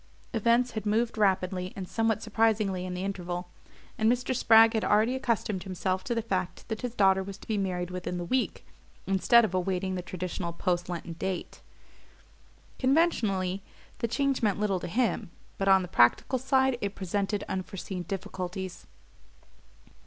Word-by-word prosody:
Events 235 Hz, +2 st, +3 dB
had 215 Hz, -2 st, -4 dB
moved 225 Hz, +3 st, +1 dB
rapidly 185 Hz, -3 st, +1 dB
and 190 Hz, -2 st, -5 dB
somewhat 225 Hz, 0 st, 0 dB
surprisingly 215 Hz, -4 st, +1 dB
in 180 Hz, -, -4 dB
the 180 Hz, -, -3 dB
interval, 180 Hz, -2 st, -4 dB, 0.5 s
and 220 Hz, +1 st, +4 dB
Mr. 250 Hz, +1 st, -1 dB
Spragg 225 Hz, 0 st, +6 dB
had 220 Hz, -, 0 dB
already 215 Hz, +4 st, +3 dB
accustomed 230 Hz, -7 st, -1 dB
himself 185 Hz, 0 st, -2 dB
to 235 Hz, -, -1 dB
the 230 Hz, -, -1 dB
fact 185 Hz, -5 st, -3 dB
that 220 Hz, -2 st, -3 dB
his 245 Hz, -1 st, -4 dB
daughter 190 Hz, -2 st, +4 dB
was 195 Hz, 0 st, -7 dB
to -, -, -15 dB
be 220 Hz, -, 0 dB
married 180 Hz, -3 st, -2 dB
within 180 Hz, 0 st, -4 dB
the 175 Hz, -, -4 dB
week, 255 Hz, +7 st, -1 dB, 0.4 s
instead 205 Hz, +5 st, +5 dB
of 185 Hz, -, -5 dB
awaiting 185 Hz, +1 st, -1 dB
the 180 Hz, -, -2 dB
traditional 180 Hz, -1 st, -4 dB
post 175 Hz, +1 st, -1 dB
Lenten 170 Hz, -1 st, -5 dB
date. 185 Hz, +2 st, -4 dB, 1.2 s
Conventionally 215 Hz, -, +2 dB, 0.4 s
the 235 Hz, -, 0 dB
change 275 Hz, +3 st, 0 dB
meant 205 Hz, -4 st, +1 dB
little 200 Hz, -3 st, +1 dB
to -, -, -5 dB
him; 230 Hz, 0 st, 0 dB, 0.3 s
but 195 Hz, -, 0 dB
on 190 Hz, -1 st, +6 dB
the -, -, -5 dB
practical 175 Hz, -, +3 dB
side 265 Hz, -1 st, +2 dB
it 200 Hz, 0 st, -3 dB
presented 200 Hz, +2 st, -2 dB
unforeseen 190 Hz, 0 st, -4 dB
difficulties. 185 Hz, 0 st, -5 dB
195 Hz, 160 wpm, -28 LUFS, 185-225 Hz, 1.2 s, Spragg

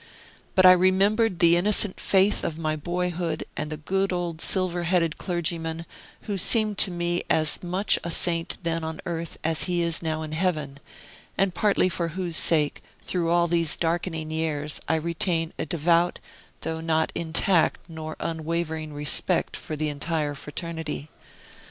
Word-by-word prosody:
But 185 Hz, -, +5 dB
I 185 Hz, -, +10 dB
remembered 190 Hz, +3 st, +3 dB
the 170 Hz, 0 st, +5 dB
innocent 200 Hz, +2 st, +1 dB
faith 195 Hz, +1 st, +2 dB
of 160 Hz, -, -3 dB
my 155 Hz, -1 st, -2 dB
boyhood, 175 Hz, +1 st, -3 dB
and 150 Hz, 0 st, -4 dB
the 155 Hz, -, -4 dB
good 190 Hz, +6 st, -1 dB
old 175 Hz, -2 st, -3 dB
silver 180 Hz, -2 st, +3 dB
headed 170 Hz, -2 st, 0 dB
clergyman, 165 Hz, -2 st, -2 dB, 0.4 s
who 205 Hz, -3 st, -4 dB
seemed 215 Hz, +2 st, +5 dB
to -, -, +5 dB
me 175 Hz, 0 st, -1 dB
as 155 Hz, -1 st, +2 dB
much 185 Hz, +3 st, +1 dB
a 170 Hz, -, -3 dB
saint 165 Hz, 0 st, 0 dB
then 165 Hz, 0 st, -2 dB
on 160 Hz, 0 st, -5 dB
earth 165 Hz, -1 st, -5 dB
as 160 Hz, 0 st, +1 dB
he 175 Hz, -2 st, 0 dB
is 170 Hz, -1 st, -1 dB
now 160 Hz, -1 st, -3 dB
in 155 Hz, -, -7 dB
heaven, 155 Hz, -4 st, -2 dB, 0.6 s
and 195 Hz, -2 st, +1 dB
partly 200 Hz, 0 st, +2 dB
for 170 Hz, -2 st, -2 dB
whose 175 Hz, 0 st, -3 dB
sake, 155 Hz, -2 st, +3 dB, 0.2 s
through 170 Hz, -2 st, -1 dB
all 170 Hz, 0 st, +3 dB
these 170 Hz, -2 st, +1 dB
darkening 165 Hz, -1 st, -2 dB
years, 155 Hz, -2 st, -2 dB
I 160 Hz, -, +2 dB
retain 165 Hz, 0 st, -1 dB
a -, -, -3 dB
devout, 170 Hz, +2 st, +1 dB, 0.4 s
though 160 Hz, 0 st, -4 dB
not 160 Hz, -1 st, 0 dB
intact 165 Hz, +1 st, +1 dB
nor 155 Hz, -1 st, -7 dB
unwavering 160 Hz, -1 st, -3 dB
respect 145 Hz, 0 st, +3 dB
for 155 Hz, -, -6 dB
the 155 Hz, 0 st, -2 dB
entire 150 Hz, 0 st, -2 dB
fraternity. 155 Hz, +1 st, -5 dB
165 Hz, 160 wpm, -25 LUFS, 160-180 Hz, 0.6 s, I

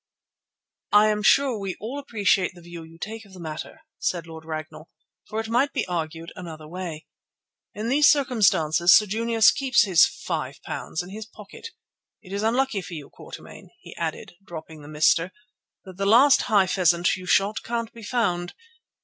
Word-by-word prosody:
"I 210 Hz, +1 st, +6 dB
am 210 Hz, 0 st, 0 dB
sure 260 Hz, +1 st, +3 dB
we 195 Hz, -2 st, -4 dB
all 245 Hz, +7 st, -5 dB
appreciate 205 Hz, -8 st, +1 dB
the 175 Hz, -, -14 dB
view 170 Hz, 0 st, -10 dB
you 165 Hz, 0 st, -14 dB
take 220 Hz, +5 st, -7 dB
of 200 Hz, -2 st, -18 dB
the 185 Hz, -, -12 dB
matter," 160 Hz, -, -7 dB, 0.2 s
said 175 Hz, -2 st, -2 dB
Lord 160 Hz, -1 st, -11 dB
Ragnall, 155 Hz, 0 st, -7 dB, 0.4 s
"for 215 Hz, -, -4 dB
it 225 Hz, -, -4 dB
might 250 Hz, +5 st, +1 dB
be -, -, -1 dB
argued 165 Hz, -1 st, -5 dB
another 160 Hz, -4 st, -9 dB
way. 170 Hz, -2 st, -7 dB, 0.7 s
In 215 Hz, +2 st, -4 dB
these 285 Hz, +4 st, +5 dB
circumstances 195 Hz, -, +4 dB
Sir 215 Hz, -, +5 dB
Junius 225 Hz, +2 st, +3 dB
keeps 260 Hz, -4 st, +2 dB
his 185 Hz, -6 st, +3 dB
£5 160 Hz, -, -5 dB
in 180 Hz, -, -11 dB
his 215 Hz, +1 st, -8 dB
pocket. 215 Hz, -, -11 dB, 0.6 s
It 190 Hz, -1 st, -11 dB
is 200 Hz, -, -2 dB
unlucky 235 Hz, -1 st, 0 dB
for 180 Hz, -1 st, -9 dB
you, 150 Hz, -3 st, -9 dB
Quatermain," -, -, -12 dB
he -, -, -13 dB
added, -, -, -5 dB
dropping 160 Hz, -4 st, -10 dB
the 145 Hz, -, -12 dB
"mister," 155 Hz, +4 st, +2 dB, 0.5 s
"that 185 Hz, -1 st, -12 dB
the 195 Hz, 0 st, -1 dB
last 255 Hz, +7 st, +6 dB
high 205 Hz, -3 st, +4 dB
pheasant 175 Hz, -2 st, +2 dB
you 185 Hz, -1 st, -10 dB
shot 200 Hz, +3 st, +2 dB
can't 230 Hz, -1 st, -4 dB
be 230 Hz, -, -12 dB
found. 205 Hz, -7 st, -1 dB
195 Hz, 175 wpm, -24 LUFS, 170-225 Hz, 0.7 s, I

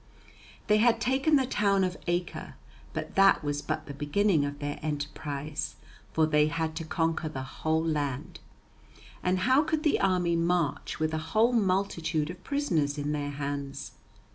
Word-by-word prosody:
They 210 Hz, -1 st, +4 dB
had 230 Hz, +1 st, +4 dB
taken 265 Hz, +6 st, +2 dB
the 270 Hz, -2 st, +3 dB
town 200 Hz, -5 st, +2 dB
of 185 Hz, -1 st, -1 dB
Acre, 175 Hz, 0 st, -2 dB, 0.4 s
but -, -, -5 dB
that 195 Hz, -4 st, +5 dB
was 145 Hz, 0 st, -1 dB
but 155 Hz, +1 st, -3 dB
the 140 Hz, -, -7 dB
beginning 150 Hz, +4 st, +2 dB
of 145 Hz, 0 st, -4 dB
their 145 Hz, 0 st, -4 dB
enterprise, 150 Hz, 0 st, -4 dB, 0.4 s
for 160 Hz, -, +3 dB
they 150 Hz, -1 st, +3 dB
had 160 Hz, 0 st, -2 dB
to 165 Hz, -, -3 dB
conquer 165 Hz, 0 st, -1 dB
the 135 Hz, -3 st, -5 dB
whole 160 Hz, +4 st, -1 dB
land. 145 Hz, -5 st, -2 dB, 0.8 s
And 185 Hz, 0 st, +1 dB
how 260 Hz, +7 st, +5 dB
could 315 Hz, 0 st, -1 dB
the 300 Hz, -, +3 dB
army 180 Hz, -3 st, +2 dB
march 170 Hz, -2 st, 0 dB
with 155 Hz, 0 st, 0 dB
a 160 Hz, -, 0 dB
whole 215 Hz, +10 st, +2 dB
multitude 180 Hz, -7 st, +1 dB
of 180 Hz, +1 st, -12 dB
prisoners 165 Hz, -, 0 dB
in 145 Hz, 0 st, -2 dB
their 145 Hz, -1 st, -2 dB
hands? 140 Hz, -1 st, -4 dB
160 Hz, 165 wpm, -29 LUFS, 145-195 Hz, 0.8 s, that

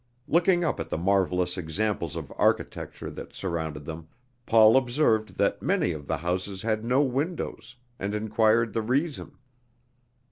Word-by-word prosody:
Looking 175 Hz, +2 st, +3 dB
up 165 Hz, -, -1 dB
at -, -, -4 dB
the -, -, -2 dB
marvelous 90 Hz, 0 st, +1 dB
examples 85 Hz, 0 st, -2 dB
of -, -, -6 dB
architecture -, -, -1 dB
that -, -, -9 dB
surrounded 80 Hz, -5 st, -4 dB
them, 80 Hz, 0 st, -7 dB, 0.4 s
Paul 110 Hz, 0 st, +7 dB
observed 120 Hz, -4 st, +2 dB
that -, -, +1 dB
many 90 Hz, -, +1 dB
of 75 Hz, -3 st, -7 dB
the 80 Hz, -, -1 dB
houses 90 Hz, +4 st, -3 dB
had 110 Hz, -1 st, 0 dB
no 125 Hz, +5 st, +3 dB
windows, 135 Hz, -3 st, -3 dB, 0.2 s
and 100 Hz, +2 st, -2 dB
inquired 110 Hz, +1 st, +2 dB
the 115 Hz, -, 0 dB
reason. 140 Hz, +7 st, -2 dB
110 Hz, 145 wpm, -27 LUFS, 90-125 Hz, 0.4 s, Paul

